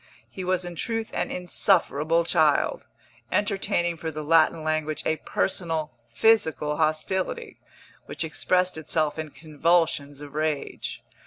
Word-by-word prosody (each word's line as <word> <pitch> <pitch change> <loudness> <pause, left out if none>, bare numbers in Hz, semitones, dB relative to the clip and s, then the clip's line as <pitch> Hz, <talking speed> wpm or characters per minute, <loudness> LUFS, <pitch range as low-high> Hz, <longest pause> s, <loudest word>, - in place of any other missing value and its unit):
He 190 - -6
was 185 0 0
in 175 -1 -6
truth 225 +4 -3
an - - -1
insufferable 170 -3 +2
child, - - +2 0.4
entertaining 195 -4 0
for 160 - -4
the 155 -1 -5
Latin 160 +1 +3
language 155 -1 -1
a 160 - +1
personal, 165 -5 -2 0.2
physical 160 -9 +2
hostility, 190 - -1 0.5
which - - -4
expressed 180 +2 0
itself 155 0 0
in 155 -1 -4
convulsions 155 -2 0
of 145 -1 -10
rage. 155 -1 -3
160 Hz, 120 wpm, -25 LUFS, 155-180 Hz, 0.5 s, Latin